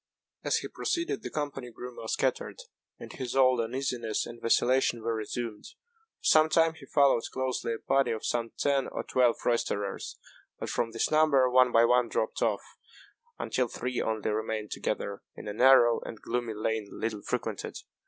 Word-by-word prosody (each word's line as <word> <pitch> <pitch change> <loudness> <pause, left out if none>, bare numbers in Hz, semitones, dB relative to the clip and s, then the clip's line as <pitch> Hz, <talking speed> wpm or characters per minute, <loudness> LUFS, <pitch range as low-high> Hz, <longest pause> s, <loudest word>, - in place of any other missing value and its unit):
As - - +2
he - - -4
proceeded, 335 -8 -2
the - - -5
company 145 -4 -4
grew 125 +1 -9
more 110 - -8
scattered, - - -1 0.4
and - - -10
his 130 -1 -5
old 130 -2 +4
uneasiness 120 -2 -2
and 120 0 -10
vacillation 120 0 +2
were 115 0 0
resumed. 110 0 -4 0.5
For - - -16
some 155 0 +6
time 165 0 +3
he 150 -4 -14
followed 140 -5 +4
closely 130 -3 -2
a - - -4
party 135 +3 +1
of 110 -1 -3
some 115 -1 -1
ten 140 -2 +1
or - - -4
twelve 125 -2 +3
roisterers; 105 -4 -1 0.4
but - - -5
from 115 - 0
this 115 0 -1
number 155 -4 +4
one 125 0 +5
by 115 0 +5
one 125 0 +3
dropped - - -2
off, - - +1 0.7
until 125 -1 -1
three 125 +2 -3
only 110 -1 -1
remained 110 0 -3
together, 100 0 -3
in - - -9
a 105 - -3
narrow 120 0 +6
and 110 - -8
gloomy 120 -2 -3
lane 110 -1 -2
little 110 -2 -4
frequented. - - -4
120 Hz, 175 wpm, -29 LUFS, 115-130 Hz, 0.7 s, some